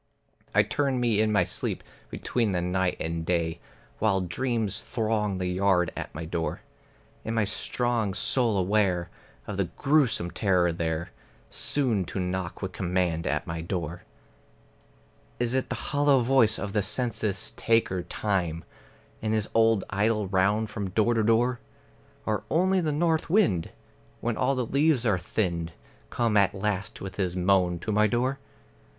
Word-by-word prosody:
I - - +6
turn 135 -3 0
me 115 -3 +2
in 110 0 +2
my 105 - +4
sleep - - -3 0.3
between 115 -5 -1
the 90 - 0
night 90 0 0
and 80 0 -3
day, 80 -1 -1 0.4
While 100 -3 +2
dreams 110 +2 -1
throng 110 -4 -1
the 90 - -2
yard 90 -1 +2
at - - -6
my 80 +1 -5
door. 80 0 -3 0.6
In 110 - -3
my 110 - +3
strong 110 0 0
soul 115 -4 +3
aware 90 -2 +1 0.3
of 100 -2 -5
a 100 - +2
grewsome 125 - +1
terror 90 -4 +2
there 80 0 -3 0.4
Soon 125 -9 +1
to 95 - -5
knock 90 0 -3
with 95 - -3
command 90 -2 -1
at - - -1
my 80 0 -4
door. 85 -1 -4 1.4
Is 120 0 0
it 130 0 0
the - - -2
hollow 145 -2 +2
voice 120 -3 +3
of 100 -1 -5
the 105 - +2
census 105 -2 -1
taker 115 -5 +1
Time 90 -4 -2 0.6
In 110 0 -1
his 110 -1 0
old 115 -3 +4
idle 105 +1 +1
round 105 +3 +1
from 105 -3 -3
door 110 +5 +2
to 115 - +2
door? 120 +3 +2 0.7
Or 110 -1 -1
only 185 +3 +2
the 155 -3 0
north 160 +2 +1
wind, 165 - +2 0.5
when 120 -1 -1
all 130 +4 +1
the 125 -1 -1
leaves 140 0 +2
are 100 -5 +2
thinned, 85 -5 -2 0.4
Come 115 -3 +1
at 100 0 +3
last 105 +2 -3
with 95 -1 -7
his 90 -3 -1
moan 90 -1 +2
to 110 - -3
my 105 +1 +4
door? 125 +5 0
105 Hz, 155 wpm, -27 LUFS, 90-120 Hz, 1.4 s, I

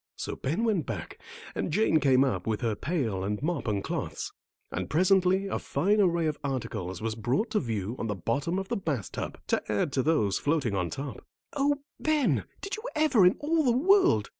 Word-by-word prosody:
So - - -4
Ben 160 +12 -1
went 205 - +1
back 100 -8 -5 0.3
and - - -2
Jane 165 -3 +3
came 135 -2 +4
up 100 -9 -1
with 110 0 -1
her 115 -3 +1
pail 120 - -1
and 105 +1 -2
mop 170 -5 -1
and 100 -2 0
cloths, - - -4 0.4
and - - -3
presently 185 +3 +3
a 195 - -2
fine 200 +9 +1
array 170 -3 +2
of 155 -1 -1
articles 110 -9 -3
was 110 -1 -1
brought 125 - -1
to 215 - +2
view 110 -2 -3
on 115 - -2
the 105 - -2
bottom 135 - -1
of 195 0 -3
the - - 0
bath 145 - -3
tub, - - -5
to - - +1
add 105 +7 0
to 130 - +2
those 125 -10 +2
floating 145 -7 0
on 90 -3 0
top. 135 - -6 0.3
"Oh, 285 0 +1 0.2
Ben, 310 -3 +1 0.2
did 395 +2 -4
you 435 - -9
ever 275 -11 +5
in 180 - +3
all 315 +2 +2
the 245 -3 +3
world!" 375 +5 +4
150 Hz, 205 wpm, -28 LUFS, -, 0.4 s, ever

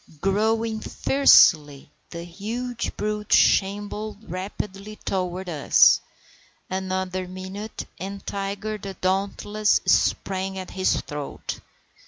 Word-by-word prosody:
Growling 220 +4 +1
fiercely, 150 - +4 0.2
the 170 -1 -7
huge 230 +7 -5
brute 210 0 -3
shambled 205 +2 +2
rapidly 195 +3 -6
toward 185 -2 -3
us. 155 -5 +5 0.7
Another 185 -1 -2
minute, 190 +4 -7
and 195 +2 -6
Tiger 200 +2 -4
the 195 -1 -7
dauntless 200 +3 +1
sprang 190 0 +1
at 185 -1 -6
his 185 0 +1
throat. 145 -1 -6
195 Hz, 95 wpm, -24 LUFS, 185-210 Hz, 0.7 s, us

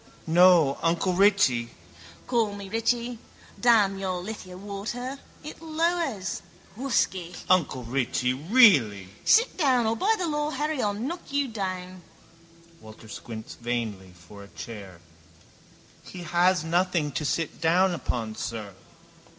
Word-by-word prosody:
—No, 170 -4 +5
uncle 170 +3 +1
Richie... 180 - +3 0.6
—Call 225 -5 0
me 200 -1 -8
Richie. 235 +2 -1 0.4
Damn 210 -5 +4
your 185 -2 -2
lithia 185 -1 -8
water. 220 +7 -5 0.2
It 305 +1 -9
lowers. 320 - -1 0.3
Whusky! 190 -8 -1
—Uncle 165 -8 +2
Richie, 125 +1 0
really... 140 - +4
—Sit 465 +3 +4
down 260 -8 +3
or 220 +1 +1
by 420 - +2
the 365 - -2
law 295 -2 -1
Harry 300 -1 -2
I'll 205 -1 0
knock 275 +12 -5
you 285 -1 +1
down. 185 -4 -5 0.8
Walter 110 -2 -14
squints 110 0 -8
vainly 115 -6 -4
for 95 +4 -13
a - - -13
chair. 100 -5 -10 1.0
—He 180 - -10
has 175 +1 +2
nothing 170 -2 0
to 145 - -3
sit 160 +2 -2
down 175 +2 +2
on, 115 -3 -1
sir. 110 -4 -5
185 Hz, 125 wpm, -26 LUFS, -, 1.0 s, No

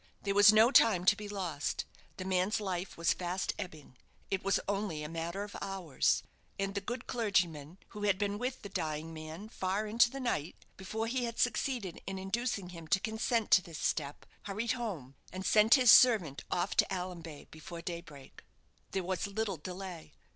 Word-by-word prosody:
There 200 - 0
was 205 +1 +8
no 220 +3 +6
time 195 -9 +5
to 205 - +6
be 210 0 -8
lost; 180 -8 -3 0.3
the 185 - -5
man's 185 +2 +1
life 185 -3 -4
was 170 0 +2
fast 180 +1 -2
ebbing; 155 -9 -8 0.3
it 195 -1 -1
was 195 +1 +2
only 195 -6 -2
a - - -4
matter 165 +4 -4
of 205 - -9
hours; 190 -7 0 0.3
and 195 0 -2
the 200 - -2
good 240 +5 -5
clergyman, 180 - 0
who 210 - -9
had 205 -3 +2
been 205 0 -1
with 250 +2 -3
the 200 - -7
dying 155 -2 -3
man 160 +5 -8
far 195 0 -2
into 230 +3 +4
the 275 - -7
night 180 - -2 0.2
before 215 +4 -4
he 245 +2 -1
had 230 -1 -5
succeeded 245 -7 -1
in 195 0 -3
inducing 200 0 -2
him 165 -3 -10
to 190 +4 +3
consent 220 +2 -1
to 185 - +8
this 165 -3 -9
step, 145 -2 -2 0.2
hurried 210 +3 -2
home, 195 - -4 0.2
and 185 +1 -6
sent 215 +1 +6
his 255 -4 +7
servant 205 - +5
off 175 -1 -1
to - - +6
Allanbay 175 -5 -5
before 165 +2 -9
daybreak. 170 -6 -8 0.5
There 190 - 0
was 185 +1 -2
little 200 -2 -2
delay. 180 -1 -8
190 Hz, 185 wpm, -32 LUFS, 170-215 Hz, 0.5 s, was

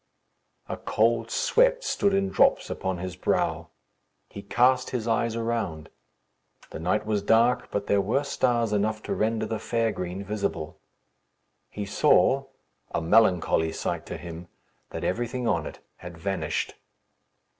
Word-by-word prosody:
A - - -4
cold 115 +1 +1
sweat - - +2
stood 200 - +1
in 195 0 +1
drops 270 +7 +3
upon 95 -1 -2
his 90 0 -5
brow. - - 0 0.6
He 100 - -8
cast 125 +5 +2
his 120 -3 -3
eyes 115 0 +1
around. 115 -9 -3 0.8
The - - -6
night 90 +6 0
was 105 -2 0
dark; 115 +4 +3
but 100 0 -2
there 100 -1 +2
were 115 +9 0
stars 120 -5 +1
enough 110 +1 0
to - - -2
render 110 +1 0
the 110 0 -3
fair 115 0 0
green 90 0 -5
visible. 95 -6 -3 0.9
He 105 - -5
saw 135 +6 +3 0.4
a - - -1
melancholy 85 -3 +3
sight - - -3
to - - -5
him 85 +1 -9 0.4
that - - -6
everything 120 +4 -2
on 85 -8 0
it - - -10 0.2
had 90 -1 -10
vanished. 80 -3 -2
110 Hz, 145 wpm, -26 LUFS, 95-120 Hz, 0.9 s, drops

